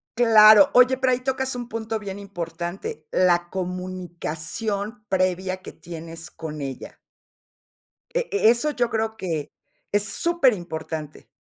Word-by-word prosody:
Claro, 225 +2 +7
oye, 250 +1 +6
pero 260 -1 +2
ahí 250 - 0
tocas 265 0 -2
un 240 -1 -6
punto 225 -1 -3
bien 200 -2 -7
importante, 175 -4 -6
la 175 -1 +2
comunicación 185 +4 -4
previa 185 0 0
que 185 - -10
tienes 165 -1 -9
con 155 -2 -7
ella. 135 -2 -7 1.1
E - - +2 0.2
e 315 - +5
eso 240 +5 -1
yo 240 - +3
creo 220 0 -1
que 165 -8 -4 0.4
es 205 0 +2 0.2
superimportante. 175 - -1
190 Hz, 125 wpm, -24 LUFS, 170-230 Hz, 1.1 s, Claro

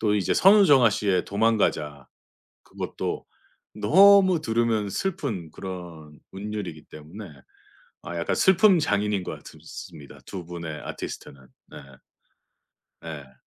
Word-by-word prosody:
또 105 -2 +1
이제 95 - 0
선우정아씨의 125 - +4
도망가자 100 - -1 0.5
그것도 - - -6 0.5
너무 195 -1 +5
들으면 115 -5 0
슬픈 105 - -4
그런 85 -5 -9
운율이기 95 -5 -7
때문에 85 +7 -11 0.7
아 85 - -7
약간 85 - -1
슬픔 190 0 +5
장인인 105 - 0
것 - - -5
같읍스 - - -12 0.3
습니다, 70 -2 -14
2 90 -3 -7
분의 85 -3 -7
아티스트는. 70 - -8 0.3
네. - - -14 1.3
예. 75 -5 -9
100 Hz, 250 characters per minute, -25 LUFS, 85-120 Hz, 1.3 s, 너무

